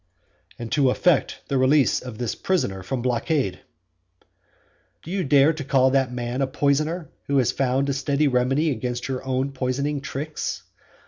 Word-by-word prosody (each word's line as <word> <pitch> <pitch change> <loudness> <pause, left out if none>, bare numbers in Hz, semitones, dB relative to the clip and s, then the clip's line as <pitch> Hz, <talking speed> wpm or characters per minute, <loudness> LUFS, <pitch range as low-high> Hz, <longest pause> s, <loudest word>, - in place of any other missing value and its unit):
"And 120 -1 -7
to 140 -3 +3
effect 160 +4 +1
the 135 - 0
release 135 +2 +4
of 125 -4 -8
this 120 -2 -2
poisoner 100 - -1
from 120 +6 -4
blockade." 125 - 0 1.4
Do 165 - -8
you 190 -1 0
dare 145 +1 +4
to 155 -1 -6
call 130 -1 +3
that 135 -2 +2
man 125 +1 -3
a 135 - +2
poisoner 150 +4 0 0.2
who 140 - +1
has 130 -4 +3
found 135 +1 0
a 140 +2 +1
remedy 135 +4 +2
against 125 0 -3
your 130 -2 -3
own 130 +1 -1
poisoning 135 +2 -2
tricks? 145 +3 -4
135 Hz, 155 wpm, -24 LUFS, 125-145 Hz, 1.4 s, release